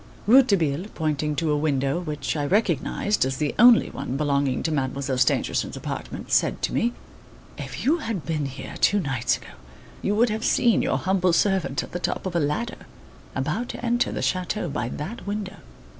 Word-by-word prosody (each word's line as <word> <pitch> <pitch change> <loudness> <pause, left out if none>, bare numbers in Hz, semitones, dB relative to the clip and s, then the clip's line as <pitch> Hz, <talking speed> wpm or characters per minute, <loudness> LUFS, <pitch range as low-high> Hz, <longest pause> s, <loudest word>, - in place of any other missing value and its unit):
Rouletabille, 200 - +4
pointing 150 -1 -1
to 155 +1 0
a - - +2
window 140 0 0
which 150 -6 -3
I 145 -2 -1
recognised 205 - +1
as 130 0 -1
the 150 -2 -1
only 240 0 +7
one 130 - -4
belonging 140 -3 0
to 160 - 0
Mademoiselle 135 -2 -1
Stangerson's 125 - +1
apartment, - - -6
said - - +2
to - - 0
me: 240 +1 +1 0.6
"If - - -6
you 305 +6 +4
had 225 - -4
been 155 -4 -1
here, 135 0 -8
two 205 - +4
nights 135 -8 0
ago, - - -14 0.5
you 205 - 0
would 235 +2 +4
have 220 +1 -3
seen 235 -2 +3
your - - +1
humble 185 -2 +1
servant 190 -7 +1
at - - -10
the 175 - -3
top - - -2
of 185 -2 -3
a - - +3
ladder, 150 +11 -2 0.5
about 240 +1 -2
to - - -6
enter 240 +1 +1
the - - -3
chateau 185 +1 -1
by 120 -4 -2
that 175 - -6
window." 205 -1 -4
165 Hz, 185 wpm, -24 LUFS, 140-210 Hz, 0.6 s, only